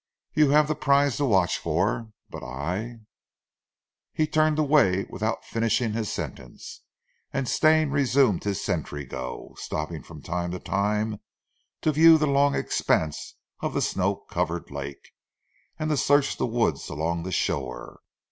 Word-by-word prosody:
You 150 -2 +4
haf 150 +1 +5
zee 155 - +1
prize 140 -3 +2
to 145 - +1
watch 95 -8 +2
for, 100 +8 -1 0.2
but - - -7
I 90 - -4 0.5
" - - -67
He 155 - +4
turned 155 0 +2
away 140 -11 +3
without 110 +1 -2
finishing 115 0 0
his 110 -2 -2
sentence, 60 -2 -7 0.5
and 135 -2 -2
Stane 155 0 +3
resumed 135 -7 +2
his 100 -2 -2
sentry 75 -5 -3
go, 65 -1 -7
stopping 75 0 -4
from 75 +2 -12
time 85 0 -2
to 90 - -4
time 105 +2 -1 0.6
to 155 - +2
view 160 +2 +7
the 155 - +1
long 140 0 +3
expanse 80 -2 -1 0.2
of - - -3
the - - +1
snow 100 +1 0
covered 85 -3 -4
lake, 70 0 -7 0.7
and 155 0 -2
to 150 - +1
search 145 +1 +3
the - - 0
woods 115 - 0
along 80 +3 -2
the 95 +2 -5
shore. 65 -7 -3
110 Hz, 150 wpm, -26 LUFS, 85-140 Hz, 0.7 s, view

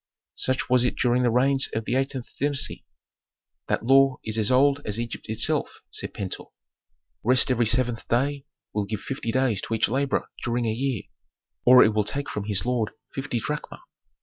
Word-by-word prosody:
"Such 130 0 0
was 125 -1 +4
it 125 - 0
during 125 0 +2
the 125 - +3
reigns 135 +3 +2
of 110 -1 -2
the 120 - -2
eighteenth 135 -2 -1
dynasty. 145 0 -1 0.8
That - - -1
law 135 +1 +5
is 110 0 -1
as 110 - +3
old 140 +2 +3
as 105 +1 -2
Egypt 120 -2 -6
itself," 110 0 0
said - - -2
Pentuer. 95 -2 -5 0.8
"Rest 130 +3 +4
every 120 -2 +2
seventh 120 0 0
day 140 +4 0 0.3
will 105 -1 -1
give 105 0 -4
fifty 130 -4 -4
days 125 -6 +1
to 115 - -2
each 110 - +2
laborer 135 +3 0 0.2
during 120 0 -1
a 110 - 0
year, 130 -2 -2 0.6
or 125 0 +9
it 110 - +2
will 105 0 +2
take 140 +7 -3
from 105 -1 -4
his 100 -1 0
lord 120 -3 0 0.2
fifty 135 -2 -3
drachma. 150 +7 -5
125 Hz, 180 wpm, -25 LUFS, 110-135 Hz, 0.8 s, or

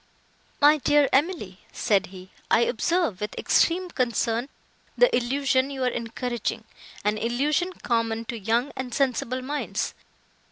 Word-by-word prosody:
"My 295 +1 +6
dear 290 +1 +4
Emily," 270 - 0
said 205 -4 +1
he, 185 0 -12 0.2
"I 225 - +4
observe 245 - 0
with 210 - -4
extreme 360 +1 +2
concern, 235 -1 0 0.5
the - - +5
illusion 265 +1 +1
you 270 -2 -4
are - - +2
encouraging—an 230 -3 -4
illusion 295 +10 0
common 230 -1 0
to 235 0 -5
young 230 +7 0
and 250 -2 -5
sensible 255 -1 0
minds. 290 +3 -3
250 Hz, 125 wpm, -25 LUFS, 225-285 Hz, 0.5 s, My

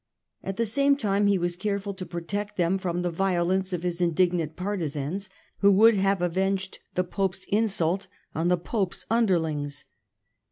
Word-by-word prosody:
At 195 0 -4
the 230 - +1
same 280 +6 +3
time 205 -4 +1
he 200 -1 +4
was 175 -1 -1
careful 200 +1 -2
to 185 -1 -7
protect 200 +5 -4
them 180 +2 +2
from 180 -1 -2
the 175 - 0
violence 185 +1 +1
of 180 -2 -3
his 175 0 -1
indignant 170 -2 +1
partisans, 180 -1 -3 0.3
who 200 0 +6
would 225 +4 +7
have 195 -2 +1
avenged 190 +2 -1 0.2
the 185 - +2
Pope's 190 +1 -2
insult 195 -3 +1 0.3
on 165 +2 0
the 180 0 +3
Pope's 190 +1 -3
underlings. 160 -10 0
190 Hz, 160 wpm, -26 LUFS, 175-200 Hz, 0.3 s, would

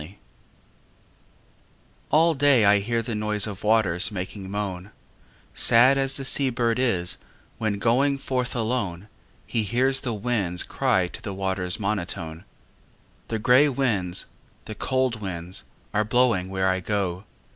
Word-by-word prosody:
XXXV 85 +7 -11 1.9
All 165 +2 +4
day 135 -6 +4
I 100 0 +5
hear 115 +3 -1
the 115 - -4
noise 105 -1 0
of 100 -3 -7
waters 105 -3 +3
Making 95 0 -6
moan, 100 -2 -4 0.6
Sad 125 +4 +6
as 135 0 0
the 135 - -5
sea 135 0 +2
bird 120 -1 0
is, 95 -9 0 0.4
when 110 -2 -1
going 130 +6 +2
Forth 130 -2 -3
alone, 110 -5 -2 0.4
He 110 +4 -1
hears 130 +6 +1
the 120 -3 -3
winds 100 -6 -1
cry 95 -2 0
to - - -10
the 100 -2 -6
water's 95 -1 -1
Monotone. 85 -5 -4 0.8
The 110 - -2
grey 125 +7 +4
winds, 105 -10 0 0.4
the 110 - -6
cold 130 -1 -1
winds 90 -2 -6 0.3
are 105 0 +2
blowing 110 -5 +1
Where 95 0 0
I 95 0 +1
go. 95 -1 -2
105 Hz, 140 wpm, -24 LUFS, 95-125 Hz, 1.9 s, Sad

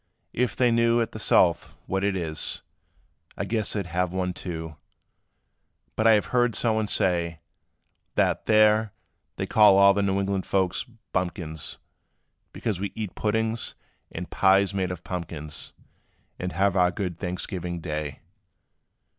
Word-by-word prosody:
If 125 0 0
they 125 -2 +3
knew 115 0 +3
At 115 - -1
the 110 - -7
South, 85 -4 +3
what 95 +1 -1
it 100 -1 +1
is, 80 -4 -2 0.7
I 100 - -2
guess 110 +1 0
they 100 - -1
'd - - -17
have 90 0 -1
one 90 0 -1
too; 80 -3 -6 1.2
But 110 - +2
I 110 - +8
have 105 +3 +1
heard 120 -2 +3
somebody 110 -2 +1
say, 85 -4 0 0.8
That, - - +1
there, 110 -1 +4 0.4
they - - -2
call 105 -3 +6
all 100 0 +7
the 100 - 0
New 100 0 +1
England 100 -1 -1
folks 95 +1 0 0.3
Bumpkins, 85 -4 -2 0.7
Because 105 -6 -3
we 100 0 -3
eat 110 -4 -4
puddings, 110 +1 -1 0.4
and - - -6
pies 95 +1 +3
made 95 -2 -1
of 90 -2 -6
pumpkins 75 -4 -6 0.7
And 90 0 -3
have 95 +2 +2
our 90 -1 +4
good 90 -2 -4
Thanksgiving 90 -1 -3
day." 75 -3 -4
95 Hz, 145 wpm, -26 LUFS, 90-110 Hz, 1.2 s, I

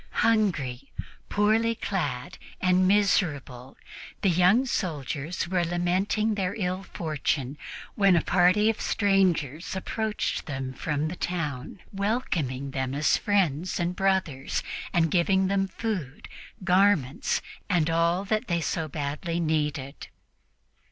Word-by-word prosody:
Hungry, 150 - 0 0.4
poorly 220 +3 +2
clad 150 - -3 0.2
and 185 0 +3
miserable, 155 - +1 0.5
the 195 - +4
young 180 +9 +4
soldiers 160 - -3
were 180 -1 +1
lamenting 180 +5 0
their 190 -3 -2
ill 185 -2 -2
fortune 150 -6 -2 0.4
when 195 -4 +4
a 170 - +2
party 185 +4 +4
of 225 - 0
strangers 180 - +1
approached 215 +2 -2
them 135 -3 -4
from 150 +2 -2
the 170 - -4
town, 165 -4 -4
welcoming 170 - -1
them 130 0 -2
as 145 +1 +3
friends 185 -5 0
and 175 +1 -1
brothers 185 -9 0 0.3
and 165 -4 +2
giving 190 +2 +3
them 195 0 +1
food, 185 - -4 0.4
garments 185 -7 +2 0.3
and 170 -4 +2
all 170 +3 +1
that 215 +4 -1
they 170 -1 +1
so 160 0 -2
badly 150 +3 -3
needed. 150 -3 -2
175 Hz, 120 wpm, -27 LUFS, 150-195 Hz, 0.5 s, the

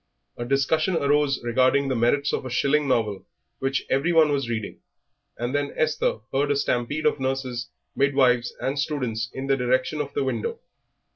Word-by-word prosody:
A 120 - -5
discussion 155 +7 +1
arose 145 -2 +2
regarding 130 +3 +2
the 130 - 0
merits 130 +5 +1
of - - -1
a 130 - -5
shilling 140 +4 +1
novel 105 -6 0 0.4
which 135 0 -1
every 140 +6 +1
one 160 -3 +5
was 140 -4 -1
reading, 110 -3 -4 0.6
and 120 +3 -3
then 145 0 0
Esther 155 -7 0
heard 140 +2 +1
a 145 - +2
stampede 140 +2 -1
of - - +2
nurses, 130 -2 -3 0.3
midwives, 130 -3 +3
and 135 +2 -2
students 125 -6 -2
in 130 - -5
the 135 0 +2
direction 130 +3 0
of 140 -1 -5
the 140 - +1
window. 125 -5 -2
135 Hz, 170 wpm, -24 LUFS, 125-145 Hz, 0.6 s, one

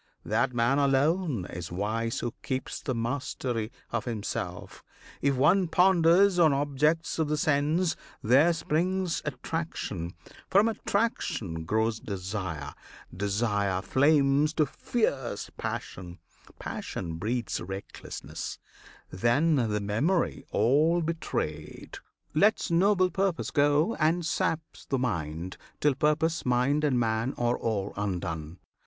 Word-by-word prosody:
That - - +1
man 120 +3 +2
alone 140 - +2
is 85 -1 -7
wise 110 +5 -2
Who 120 -1 -3
keeps 130 0 -3
the 130 - -2
mastery 120 -1 -2 0.2
of 115 -2 -2
himself! 110 -4 -5 0.4
If 140 -1 +2
one 175 +8 +4
Ponders 180 +2 +4
on 160 -4 +6
objects 145 +4 +1
of 160 - +2
the 150 0 0
sense, 155 +3 +1 0.3
there 135 +9 +5
springs 175 +3 0
Attraction; 130 - -4 0.3
from 200 +3 +5
attraction 170 - -1
grows 110 +3 0
desire, 90 -7 -4 0.4
Desire 100 -1 0
flames 145 +1 +3
to 155 - +3
fierce 140 - -2
passion, 90 -1 -5 0.4
passion 85 -3 -5
breeds 115 +5 -2
Recklessness; 95 +2 -7 0.5
then 120 - +2 0.2
the 105 0 0
memory 140 - 0
all 155 +8 +3
betrayed 80 - -4 0.3
Lets 200 +4 +3
noble 185 +1 +3
purpose 190 -1 -1
go, 145 +7 +3
and 165 +2 +2
saps 160 0 -2
the 135 - -1
mind, 85 -7 -3 0.2
Till 145 -1 +3
purpose, 150 +4 +1
mind, 125 +4 +2
and 135 -5 +2
man 115 +2 0
are 120 0 +1
all 100 -3 -2
undone. 90 -5 -3
135 Hz, 115 wpm, -28 LUFS, 105-160 Hz, 0.5 s, on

